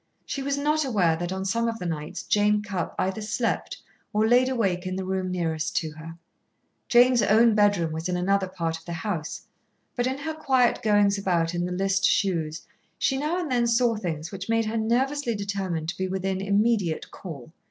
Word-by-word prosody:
She 275 - -4
was 280 +1 -1
not 300 +2 +1
aware 195 - +2
that 175 +1 -3
on 190 0 -3
some 230 +4 0
of 230 -1 -2
the 180 - -6
nights 155 -3 -4
Jane 210 0 +2
Cupp 195 -5 -4
either 190 +3 -1
slept 215 +2 -2 0.3
or 215 +1 +2
laid 250 +2 +4
awake 195 -8 0
in 185 - -3
the 190 0 -3
room 190 0 -2
nearest 165 -4 -2
to 160 - -1
her. 160 +2 -10 0.7
Jane's 245 0 +5
own 225 +2 +5
bedroom 205 -6 +3
was 160 +3 -4
in 180 - 0
another 195 +2 +1
part 165 -3 -3
of 165 - -22
the 170 - -5
house, 165 -2 -4 0.5
but 245 0 0
in 260 +1 -2
her 300 +3 -4
quiet 260 -5 +2
goings 205 -2 +3
about 175 -3 0
in 175 0 -1
the - - -5
list 195 +2 0
shoes 165 -6 +1 0.3
she 270 - +1
now 300 +6 -1
and 340 -6 -3
then 240 -1 +2
saw 235 0 +3
things 170 -6 -4
which 195 +1 -7
made 225 0 +2
her 215 +1 -3
nervously 245 +3 0
determined 195 -5 -3
to - - -5
be 190 - 0
within 190 0 -2
immediate 200 -4 +1
call. 160 -6 -9
200 Hz, 200 wpm, -26 LUFS, 175-230 Hz, 0.7 s, Jane's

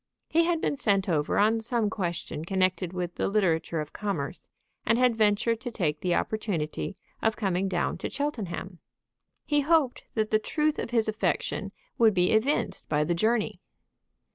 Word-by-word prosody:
He 335 +1 +3
had 340 -1 +1
been 285 - 0
sent 200 -7 +1
over 150 -5 +1
on 220 +2 +4
some 230 -1 0
question 175 -6 -3
connected 185 0 0
with 180 -1 -3
the - - -1
literature 175 -5 +1
of 150 - -8
commerce, 185 -7 -3 0.4
and 230 +1 +2
had 250 -2 +4
ventured 220 +2 +2
to 250 - -4
take 160 -10 -1
the 180 -1 +1
opportunity 195 -4 -2 0.2
of 225 -1 +2
coming 195 -2 0
down 175 -2 -1
to - - -3
Cheltenham. 195 - -4 0.7
He 295 -1 +2
hoped 300 -3 +2
that 215 -1 0
the 215 - +4
truth 300 +7 0
of - - -3
his 230 -2 +1
affection 215 0 -1 0.3
would 220 -3 +5
be 180 0 +3
evinced 230 +1 +1
by 150 0 +2
the 175 - 0
journey. 220 +5 0
210 Hz, 165 wpm, -27 LUFS, 175-230 Hz, 0.7 s, would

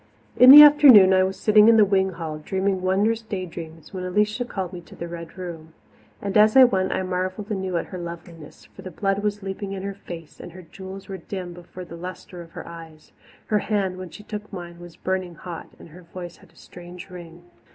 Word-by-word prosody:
In 250 - +7
the 295 +2 +13
afternoon 275 -10 +8
I 185 - +4
was 190 0 -2
sitting 215 0 +5
in 230 -1 +6
the 215 - +6
wing 190 -1 +1
hall, 160 -3 -6
dreaming 190 +4 -2
wondrous 205 +5 0
day 200 -4 -5
dreams, 165 -2 -11
when 185 -1 -5
Alicia 210 +6 -1
called 190 -6 -5
me 175 - -8
to - - -16
the 170 - -7
Red 170 +1 -9
Room. 165 -3 -9 0.5
And 200 -1 -4
as 215 +4 +5
I 265 - +10
went, 190 -6 +1
I - - -2
marvelled 185 +3 -4
anew 190 -3 -2
at - - -3
her 185 - -8
loveliness, 170 -2 -10
for - - -15
the 185 - -8
blood 195 +3 -2
was 205 -1 -3
leaping 195 +1 -6
in 190 -1 -6
her 200 0 -4
face 170 -5 -11
and 175 - -10
her 185 0 -12
jewels 190 +3 -11
were 195 - -6
dim 180 0 -7
before 175 +1 -11
the 170 0 -11
lustre 180 0 -9
of 165 -1 -14
her - - -9
eyes. 165 -2 -13 0.3
Her 210 - +1
hand, 195 -3 -2
when 185 -1 -8
she 210 - -13
took 210 0 -8
mine, 175 -3 -9
was 175 -1 -12
burning 185 -2 -4
hot, 170 +1 -9
and - - -15
her 175 +4 -14
voice 175 0 -10
had - - -21
a - - -30
strange 175 +1 -13
ring. 175 -1 -12
185 Hz, 225 wpm, -23 LUFS, 170-200 Hz, 0.5 s, the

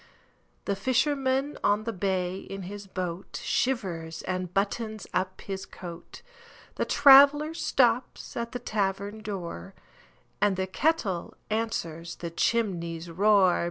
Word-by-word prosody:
The 200 - 0
fisherman 265 +4 +1
on 205 +1 +3
the 230 0 -3
bay 185 -1 -1
in 195 0 -7
his 200 +2 -8
boatShivers 180 -1 -2
and 185 -1 -2
buttons 215 +2 -2
up 185 0 -1
his 195 -1 -5
coat; 175 -1 -10 0.5
The - - -1
traveller 285 +2 +7
stops 250 -6 +1
at 235 0 -3
the - - -3
tavern 205 -2 -2
door, 170 - -6 0.7
And 205 -2 +3
the 190 0 -1
kettle 195 - -1 0.2
answers 170 -7 -2
the 170 -1 -6
chimney's 170 -5 -1
roar. 195 0 +4
200 Hz, 120 wpm, -27 LUFS, 180-235 Hz, 0.7 s, traveller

